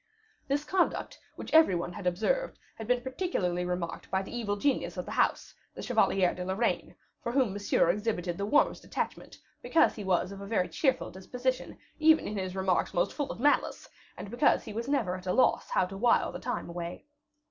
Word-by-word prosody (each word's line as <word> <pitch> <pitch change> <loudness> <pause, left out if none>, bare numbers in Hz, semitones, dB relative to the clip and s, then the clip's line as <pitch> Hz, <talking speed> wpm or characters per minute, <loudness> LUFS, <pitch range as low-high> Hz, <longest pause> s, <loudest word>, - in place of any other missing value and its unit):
This 285 +2 0
conduct, 360 +3 0 0.2
which - - -8
every 320 - +6
one 175 +1 -3
had 180 +1 -5
observed, 220 - 0 0.2
had 220 - -8
been 250 0 +2
particularly 230 - -1
remarked 180 -1 -4
by 190 0 0
the 195 - -8
evil 210 -4 -1
genius 275 +6 0
of - - -3
the - - -7
house, - - 0 0.2
the - - -7
Chevalier 185 -2 +2
de 180 - -5
Lorraine, 190 +6 -1 0.3
for 235 - -3
whom 250 -6 +2
Monsieur 200 -4 +2
exhibited 190 -3 -2
the 200 - -3
warmest 290 - +2
attachment - - -4 0.2
because 325 - +3
he 210 - -7
was 185 0 +1
of 200 0 -8
a 200 - -7
very 200 -4 0
cheerful 265 -4 0
disposition, 250 +7 -3 0.2
even 315 0 +5
in 210 - -4
his 185 -2 -3
remarks 190 -1 0
most 175 - +1
full 290 -2 -3
of - - -8
malice, 290 +4 +1 0.3
and 205 - -8
because 240 - +3
he 215 - -8
was 230 +3 -4
never 225 -11 +1
at 185 0 -9
a 180 - +1
loss 260 - +3
how - - +2
to 190 +2 -8
wile 235 +5 +3
the - - -7
time - - -3
away. 170 0 -6
205 Hz, 200 wpm, -29 LUFS, 185-255 Hz, 0.3 s, every